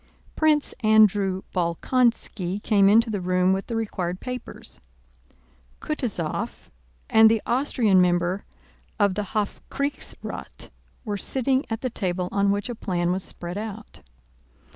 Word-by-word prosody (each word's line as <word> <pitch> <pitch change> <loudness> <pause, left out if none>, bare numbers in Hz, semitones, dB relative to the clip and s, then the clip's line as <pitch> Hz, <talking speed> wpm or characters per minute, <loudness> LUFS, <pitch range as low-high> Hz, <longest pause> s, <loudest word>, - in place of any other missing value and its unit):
Prince 305 -2 +2
Andrew 205 -3 +3
Bolkónski 190 +1 0
came 200 -2 +4
into 225 +2 +4
the 205 -3 -2
room 180 +1 +2
with 195 +1 -3
the 230 - -3
required 185 -5 -3
papers. 250 0 -8 1.0
Kutúzov - - -3 0.4
and 220 0 +7
the 225 0 +2
Austrian 235 -7 +3
member 175 +2 +1 0.6
of 200 -2 +3
the 205 +2 -3
Hofkriegsrath 280 +7 -4 0.4
were 205 -2 -2
sitting 265 +5 +1
at 225 0 -3
the 255 - -2
table 180 -4 -2
on 200 0 +2
which 200 0 0
a 245 - -4
plan 175 -5 -1
was 185 +1 -1
spread 175 +3 -4
out. 215 0 -8
205 Hz, 125 wpm, -24 LUFS, 185-225 Hz, 1.0 s, and